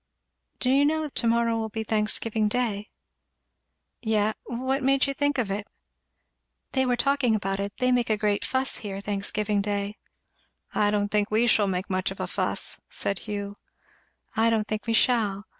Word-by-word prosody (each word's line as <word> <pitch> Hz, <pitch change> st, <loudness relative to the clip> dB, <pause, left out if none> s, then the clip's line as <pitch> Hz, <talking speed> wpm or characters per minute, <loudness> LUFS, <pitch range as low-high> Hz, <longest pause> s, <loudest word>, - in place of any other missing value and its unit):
"Do 255 Hz, -, +1 dB
you 275 Hz, +2 st, +5 dB
know 310 Hz, +1 st, +1 dB
to 240 Hz, -, 0 dB
morrow 230 Hz, 0 st, +2 dB
will 220 Hz, 0 st, -2 dB
be 220 Hz, +1 st, -3 dB
Thanksgiving 215 Hz, 0 st, +1 dB
day?" 215 Hz, -2 st, -1 dB, 1.1 s
"Ye 215 Hz, -2 st, +2 dB, 0.2 s
what 260 Hz, +3 st, -1 dB
made 270 Hz, +1 st, +3 dB
you 275 Hz, -, -1 dB
think 285 Hz, +1 st, 0 dB
of 225 Hz, -6 st, 0 dB
it?" 205 Hz, +1 st, -4 dB, 1.0 s
"They 265 Hz, -1 st, +1 dB
were 245 Hz, -, +3 dB
talking 260 Hz, -2 st, +2 dB
about 195 Hz, -2 st, -2 dB
it 200 Hz, 0 st, -2 dB
they 255 Hz, 0 st, +2 dB
make 245 Hz, -2 st, +2 dB
a 215 Hz, -, +2 dB
great 205 Hz, -1 st, 0 dB
fuss 260 Hz, +1 st, 0 dB
here 195 Hz, -2 st, -5 dB
Thanksgiving 205 Hz, +1 st, -1 dB
day." 205 Hz, 0 st, -2 dB, 0.8 s
"I 205 Hz, -, +3 dB
don't 205 Hz, 0 st, +1 dB
think 210 Hz, 0 st, +1 dB
we 220 Hz, +3 st, +3 dB
shall 215 Hz, -3 st, +4 dB
make 185 Hz, 0 st, -2 dB
much 185 Hz, -2 st, 0 dB
of -, -, -8 dB
a -, -, -1 dB
fuss," -, -, -1 dB
said 195 Hz, -, -2 dB
Hugh. 205 Hz, -1 st, -3 dB, 0.8 s
"I 225 Hz, +1 st, +4 dB
don't 220 Hz, -1 st, +1 dB
think 215 Hz, +1 st, -3 dB
we 230 Hz, -, +1 dB
shall. 215 Hz, -5 st, +2 dB
220 Hz, 175 wpm, -26 LUFS, 205-245 Hz, 1.1 s, you